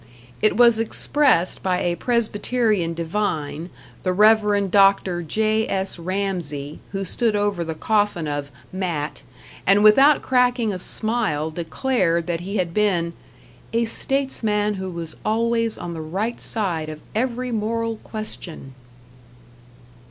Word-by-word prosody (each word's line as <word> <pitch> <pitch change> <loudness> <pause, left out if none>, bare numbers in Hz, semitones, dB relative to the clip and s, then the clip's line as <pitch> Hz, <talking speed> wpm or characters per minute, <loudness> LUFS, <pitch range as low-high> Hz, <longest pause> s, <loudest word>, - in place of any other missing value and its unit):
It 215 - +3
was 235 -2 +6
expressed 225 - +1
by 185 -1 0
a 175 -1 +1
Presbyterian 215 -5 0
divine, 165 -2 -2 0.3
the 185 - 0
Reverend 210 -1 +4
Dr. 195 -3 +4
J.S. 215 +1 -1
Ramsey, 170 -6 -3
who 195 -1 -3
stood 225 +3 +1
over 205 -4 0
the 160 -1 -4
coffin 205 -4 0
of 145 -1 -3 0.2
"Matt", 160 -6 -3 0.5
and 200 +2 +5
without 270 +8 +6
cracking 245 -4 +2
a 185 - -4
smile 200 -8 -1
declared 170 0 0
that 170 -1 -2
he 195 +4 -4
had 175 -3 -1
been 175 -5 +1 0.6
"a 230 0 +2
statesman 220 -5 -1
who 190 -1 -5
was 170 -3 -7
always 230 +1 +1
on 175 -1 -6
the 160 - -5
right 195 +9 -3
side 175 -8 -1
of 155 -1 -7
every 250 +2 -1
moral 225 +1 -1
question!" 180 -11 -7
200 Hz, 125 wpm, -22 LUFS, 170-225 Hz, 0.6 s, was